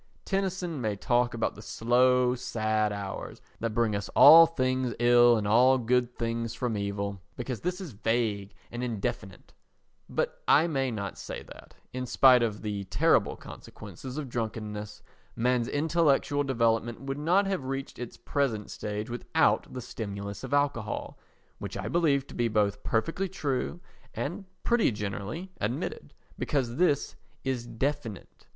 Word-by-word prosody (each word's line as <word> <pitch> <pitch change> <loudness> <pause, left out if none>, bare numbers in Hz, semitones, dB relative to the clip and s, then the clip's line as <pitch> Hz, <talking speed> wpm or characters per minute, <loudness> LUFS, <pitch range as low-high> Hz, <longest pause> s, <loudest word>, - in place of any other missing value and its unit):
Tennyson 190 -6 -2
may 110 -3 -1
talk 120 +3 +1
about 115 - -1
the 105 - -11
slow 125 +3 +3
sad 110 -4 0
hours 100 -1 -6 0.2
that 115 -1 -3
bring 115 -3 +2
us 100 - -4
all 165 +3 +10
things 130 -5 -1
ill 120 0 +6
and 105 -1 -2
all 125 +5 +5
good 125 0 0
things 115 -1 -2
from 125 -4 -2
evil, 100 -1 -3
because 125 -1 -5
this 180 +2 -2
is 180 -7 -7
vague 105 -2 -1 0.2
and 120 +1 -4
indefinite; 100 -5 -4 0.6
but - - -2
I 155 +4 +6
may 135 -5 0
not 100 -4 -5
say - - -6
that, - - -14 0.2
in 125 0 -4
spite 130 0 +6
of 110 -2 -2
the 100 -2 -3
terrible - - +2
consequences 110 - -10
of 150 -3 -3
drunkenness, 110 -3 -5 0.3
man's 125 0 +1
intellectual 145 -2 +2
development 115 -3 0
would 135 +1 -4
not 180 +7 +3
have 190 -8 -2
reached 135 +1 -5
its 125 -1 -7
present 125 -8 -1
stage 105 +1 -4
without 120 0 +1
the 125 - -6
stimulus 100 -4 -6
of - - -6
alcohol—which 140 -7 -3
I - - -4
believe 145 -6 +2
to - - -12
be 120 - +1
both 105 -2 +1
perfectly 165 +11 -1
true 150 -1 -2 0.4
and 180 +7 -4 0.2
pretty 235 - +3
generally 105 - -5
admitted—because 120 +2 -3
this 170 -5 +1 0.3
is 125 -3 -2
definite. 120 -2 -4
120 Hz, 145 wpm, -28 LUFS, 110-140 Hz, 0.6 s, all